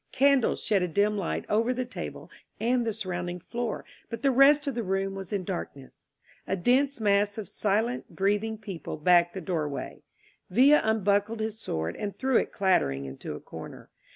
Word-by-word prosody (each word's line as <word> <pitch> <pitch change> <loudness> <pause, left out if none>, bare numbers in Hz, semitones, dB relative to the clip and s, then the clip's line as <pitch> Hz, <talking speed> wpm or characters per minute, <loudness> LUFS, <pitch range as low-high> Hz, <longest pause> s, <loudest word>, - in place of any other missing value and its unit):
Candles 275 -2 +3
shed 205 -4 +2
a 180 - +1
dim 205 +5 +1
light 195 -4 -2
over 230 +4 +1
the 255 0 -2
table 250 - -8 0.3
and 240 +1 +1
the - - +1
surrounding 180 -3 -4
floor, 235 +5 -4 0.2
but 230 - -6
the 275 - +4
rest 280 +3 +6
of 280 - -1
the 240 - -2
room 195 -1 -1
was 195 -2 -7
in 200 -3 -1
darkness. 170 -7 -7 0.4
A 190 - 0
dense 260 +7 +2
mass 205 -1 +2
of 215 - -5
silent, 220 +4 -1
breath 200 +2 +2
ing 220 0 -4
people 195 -7 -7
packed 175 +2 +4
the 190 - -4
doorway. 155 -5 -3 0.5
Villa 270 +9 +6
unbuckled 215 0 +1
his 220 0 -3
sword 80 - -3
and 205 -1 -5
threw 265 -2 +2
it - - 0
clattering 70 - +1
into 65 0 -7
a - - -7
corner. - - -10
205 Hz, 180 wpm, -28 LUFS, 185-235 Hz, 0.5 s, rest